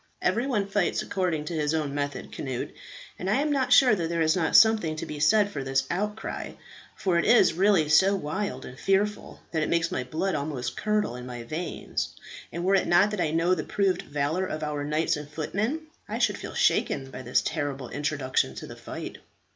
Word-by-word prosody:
"Every 240 +3 +1
one 210 -7 0
fights 195 -2 0
according 175 -6 -1
to 170 - -4
his 150 -1 0
own 150 -3 -1
method, 145 -1 -3
Cnut; 130 -3 -4 0.5
and 185 - -3
I 210 - +3
am 295 +3 +1
not 270 -3 0
sure 255 -4 +7
that 170 -5 -1
there 170 -1 +1
is 155 0 +3
not 165 -4 0
something 215 -8 +5
to 155 - -5
be 150 - -6
said 205 +7 +4
for 140 -6 -4
this 135 0 +1
outcry, 210 +4 -3 0.4
for 180 -3 +1
it - - 0
is 235 -6 +5
really 185 -3 +3
so 190 +7 +5
wild 170 -4 -3
and 125 - -10
fearful 205 +2 0
that 160 - 0
it 155 - 0
makes 170 0 +1
my 130 - -1
blood 165 +9 -2
almost 140 -5 -3
curdle 210 - 0
in 125 0 -8
my 120 -1 -6
veins; 160 +8 -4 0.4
and 170 +2 -4
were 190 +2 +2
it 195 - +3
not 195 +4 +4
that 210 -4 -2
I 155 - +1
know 165 +3 +2
the 160 -4 -1
proved 195 -2 0
valour 150 +6 -1
of 155 -2 -4
our 150 -1 -2
knights 150 +2 0
and 150 -1 -8
footmen, 200 - -2 0.3
I - - -2
should - - +1
feel - - -7
shaken 135 -1 +1
by 130 - -7
this 125 0 +1
terrible 145 -5 -3
introduction 145 -2 -1
to - - -7
the - - -9
fight." - - -7
165 Hz, 210 wpm, -27 LUFS, 145-195 Hz, 0.5 s, sure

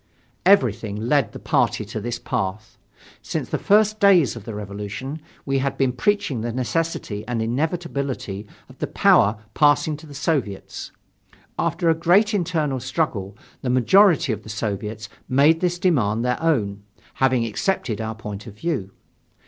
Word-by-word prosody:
Everything 115 - +3
led 120 +2 +1
the - - -8
party 105 - 0
to 110 +1 -5
this 120 +2 -3
path. 110 -3 -4 0.4
Since - - -4
the - - -1
first 215 +1 +3
days 185 -10 +5
of 115 -3 -9
the 115 -3 -6
Revolution, 105 +8 -6 0.2
we 135 -1 +1
had 135 0 -2
been 130 -2 +1
preaching 175 - 0
the 120 +1 -2
necessity 125 -4 -2
and 120 -1 -2
inevitability 135 - -2 0.2
of - - -17
the - - -2
power 105 +2 +4 0.2
passing 145 +2 +3
to 155 +1 -13
the 145 - -11
Soviets. 135 - -2 0.7
After 170 +1 0
a 165 - +6
great 180 +7 +3
internal 160 -8 0
struggle, 120 - -2 0.2
the 130 - -2
majority 150 - +4
of 105 - -6
the 110 - -12
Soviets 105 0 -4 0.2
made 145 +5 +4
this 175 0 0
demand 120 - +1
their 125 +3 0
own, 105 -12 0 0.4
having 130 -3 +3
accepted 115 - -1
our 110 0 -4
point 105 0 -7
of 105 - -10
view. 130 - -2
130 Hz, 155 wpm, -22 LUFS, 110-160 Hz, 0.7 s, a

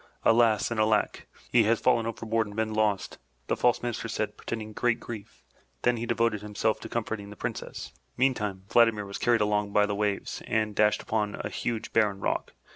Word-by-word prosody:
*'Alas 115 -1 +4
and 115 - -1
alack! 110 0 +1 0.2
He 120 - +6
has 115 +1 +3
fallen 115 -1 +2
overboard 115 -1 -1
and 105 - -10
been 110 0 -1
lost," 105 -2 0 0.3
the - - 0
false 120 0 +2
Minister 120 -2 -3
said, - - -2
pretending 110 -2 -5
great 120 +1 +1
grief, 105 - -9
and - - -33 0.2
then 120 0 +3
he 115 +1 -4
devoted 115 -3 +1
himself 105 +1 -1
to - - -8
comforting 110 -3 -3
the 105 - -10
Princess. - - -5 0.3
Meantime, 105 -7 0
Vladimir 115 -2 +4
was 100 0 -6
carried 120 -2 +3
along 105 -1 +1
by 105 - +5
the 105 - -2
waves 100 -1 -2
and 110 -1 0
dashed 105 0 +3
upon 105 -2 -1
a - - -4
huge, 115 -2 -3
barren 105 -3 +2
rock. - - -2
110 Hz, 195 wpm, -28 LUFS, 105-115 Hz, 0.3 s, He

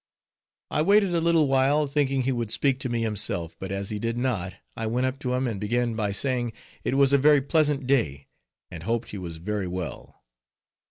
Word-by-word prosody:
I - - +2
waited 200 +2 +4
a 170 - +2
little 165 -3 +3
while, 135 +3 +3
thinking 135 -2 0
he 135 - +1
would 120 -3 -2
speak 135 +3 +1
to 130 - -2
me 120 -1 -1
himself; 100 -6 -1
but 95 0 -5
as 100 +1 -3
he 105 - -3
did 115 +2 -2
not, 105 -8 -1 0.2
I 115 - -2
went 125 +3 0
up 130 +1 -2
to 125 -3 -1
him, 130 +1 0
and 110 -5 -2
began 120 +2 0
by 105 -2 -1
saying 120 +1 -1 0.3
it 130 - 0
was 140 0 +5
a 140 - +6
very 145 +1 +6
pleasant 145 -2 +1
day, 75 - +1 0.5
and 85 -3 -7
hoped 115 +6 -2
he 100 - -6
was 85 -3 -6
very 100 +3 -3
well. 90 -1 -6
120 Hz, 210 wpm, -26 LUFS, 105-140 Hz, 0.5 s, a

